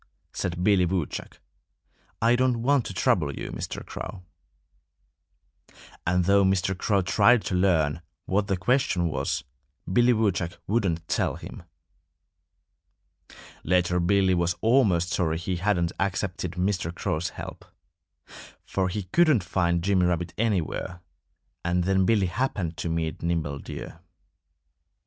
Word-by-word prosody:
said 90 0 -3
Billy 100 -2 +4
Woodchuck. 90 -3 -3 0.8
"I 115 +1 +5
don't 125 -2 +1
want 140 -1 +2
to - - -6
trouble 75 -7 +1
you, - - -5
Mr. - - -6
Crow." 95 -3 -7 1.8
And 90 0 +2
though 100 +1 +5
Mr. 95 0 +1
Crow 100 +1 +1
tried 105 +5 +4
to - - -3
learn 85 -5 +2 0.2
what 100 +1 0
the 95 -3 0
question 95 -4 +1
was, 75 - -2 0.5
Billy 120 +4 +5
Woodchuck 95 -7 0
wouldn't 90 -6 0
tell - - 0
him. - - -9 2.0
Later 90 +1 +2
Billy 95 +1 +3
was 85 0 +1
almost 105 -8 +3
sorry 80 -3 0
he 90 +2 -3
hadn't 90 -2 +1
accepted 95 -2 -2
Mr. 90 -2 -1
Crow's 85 -1 -2
help. - - -8 1.0
For 95 -1 -1
he 105 +2 -3
couldn't 140 - +3
find 85 -1 0
Jimmy 95 -2 +3
Rabbit 85 -1 -1
anywhere. 95 -4 -2 0.6
And 90 +1 +1
then 95 +1 +2
Billy 105 -4 +3
happened 90 -4 -2
to 80 +2 -3
meet 80 -1 -2
Nimble 80 -4 -1
Deer. 80 - -8
90 Hz, 125 wpm, -26 LUFS, 85-100 Hz, 2.0 s, I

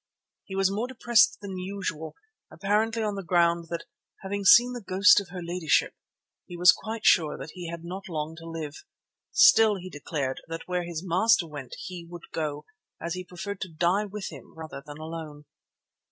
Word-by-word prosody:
He 190 - -7
was 195 0 +2
more 215 +5 -2
depressed 240 -3 +3
than 195 -2 -6
usual, 180 -5 -5 0.4
apparently 220 +3 0
on 210 -1 -1
the 200 - -4
ground 170 0 +2
that 170 -1 -4 0.4
"having 200 +1 -3
seen 245 +4 +7
the 245 - -6
ghost 195 +1 +5
of 195 -3 -8
her 180 -1 -7
ladyship" 170 -2 +1 0.5
he 175 - -8
was 180 +2 +7 0.3
sure 155 -7 +4 0.2
he 175 -2 -7
had 170 0 -7
not 185 +3 -7
long 155 -1 -4
to 165 0 -9
live. 160 -3 -6 0.5
Still, 225 -7 +6
he 185 -1 -8
declared 145 -3 -3
that 165 0 -7
where 180 -1 -1
his 170 +1 -5
master 190 +3 +3
went 145 -5 -8
he 180 -2 -7
would 175 -1 -11
go, 150 -2 -3 0.3
as 170 0 -3
he 185 - -5
preferred 180 +2 -7
to 190 - -4
die 175 +6 +1
with 205 -1 -6
him 140 -6 -13
rather 160 -3 -8
than 145 0 -10
alone. 155 -2 -8
175 Hz, 180 wpm, -27 LUFS, 160-200 Hz, 0.5 s, seen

